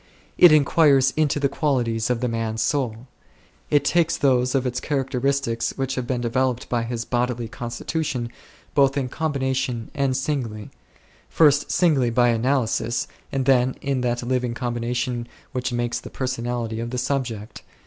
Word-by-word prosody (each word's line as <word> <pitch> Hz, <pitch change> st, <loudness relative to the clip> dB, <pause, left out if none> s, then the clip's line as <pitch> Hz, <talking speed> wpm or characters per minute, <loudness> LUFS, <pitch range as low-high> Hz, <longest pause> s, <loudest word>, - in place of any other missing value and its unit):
It 175 Hz, -, +8 dB
inquires 140 Hz, -3 st, +5 dB
into 150 Hz, -2 st, +1 dB
the 140 Hz, -, +2 dB
qualities 125 Hz, -6 st, 0 dB
of 125 Hz, -1 st, 0 dB
the 125 Hz, -, +1 dB
man's 115 Hz, -1 st, -2 dB
soul. 125 Hz, -5 st, -1 dB, 0.6 s
It 145 Hz, -1 st, +3 dB
takes 170 Hz, +1 st, +2 dB
those 125 Hz, -1 st, +2 dB
of 130 Hz, -1 st, +1 dB
its 125 Hz, 0 st, -1 dB
characteristics 135 Hz, -3 st, -1 dB
which 135 Hz, -1 st, -1 dB
have 130 Hz, -2 st, -3 dB
been 125 Hz, -1 st, -1 dB
developed 125 Hz, +1 st, 0 dB
by 120 Hz, -1 st, +1 dB
his 115 Hz, 0 st, -4 dB
bodily 120 Hz, -1 st, -1 dB
constitution, 120 Hz, +2 st, -3 dB, 0.4 s
both 140 Hz, 0 st, +3 dB
in 130 Hz, -2 st, -1 dB
combination 130 Hz, -6 st, -2 dB
and 135 Hz, -2 st, 0 dB
singly; 125 Hz, -7 st, -3 dB, 0.6 s
first 145 Hz, -2 st, +4 dB
singly, 145 Hz, -9 st, +3 dB
by 120 Hz, +1 st, +3 dB
analysis, 120 Hz, -1 st, 0 dB, 0.2 s
and 135 Hz, -1 st, -1 dB
then 130 Hz, -1 st, +3 dB
in 135 Hz, -2 st, -1 dB
that 120 Hz, 0 st, -1 dB
living 125 Hz, -1 st, -1 dB
combination 120 Hz, 0 st, -2 dB, 0.2 s
which 130 Hz, -1 st, -2 dB
makes 120 Hz, 0 st, -1 dB
the -, -, -10 dB
personality 120 Hz, -3 st, -3 dB
of 115 Hz, 0 st, -3 dB
the 125 Hz, -, -4 dB
subject. 125 Hz, -5 st, -3 dB
125 Hz, 150 wpm, -23 LUFS, 120-135 Hz, 0.6 s, It